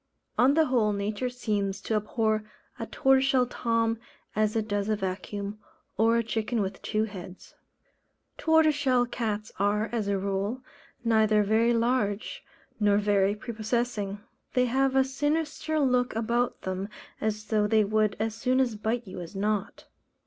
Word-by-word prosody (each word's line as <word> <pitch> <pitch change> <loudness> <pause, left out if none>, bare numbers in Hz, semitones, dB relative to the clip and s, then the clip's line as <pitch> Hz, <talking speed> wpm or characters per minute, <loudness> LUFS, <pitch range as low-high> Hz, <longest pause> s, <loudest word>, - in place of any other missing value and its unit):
On 265 +4 +4
the 320 0 +5
whole, 230 -6 +2
nature 205 +5 -2
seems 210 -5 -2
to - - -3
abhor 215 0 0 0.4
a - - -4
Tortoiseshell 265 -1 +3
Tom 230 -2 0 0.4
as 215 0 +1
it 220 -1 0
does 205 0 -1
a 215 - +2
vacuum, 200 +2 -4 0.4
or 225 +1 +3
a 235 - +1
chicken 225 +1 -1
with 195 -2 -3
two 215 0 0
heads. 190 -3 -8 0.9
Tortoiseshell 290 -6 +3
cats 215 -3 -3
are, 210 +2 +1
as 225 -4 -1
a 200 -1 +1
rule, 200 +6 -2 0.4
neither 220 -2 +4
very 225 +3 +3
large, 230 -3 0 0.4
nor 205 -1 +4
very 205 -1 +2
prepossessing. 215 -2 -2 0.4
They 250 0 +4
have 265 +2 +1
a 265 - +6
sinister 300 +3 -1
look 250 -4 +2
about 235 +2 0
them, 190 +2 -3 0.3
as 215 0 -2
though 210 -1 +1
they 215 0 +4
would 215 0 +1
as 220 0 -1
soon 255 +3 +2
bite 225 +3 -1
you 185 -2 -8
as 175 +3 -9
not. 205 +1 -2
220 Hz, 150 wpm, -28 LUFS, 205-245 Hz, 0.9 s, a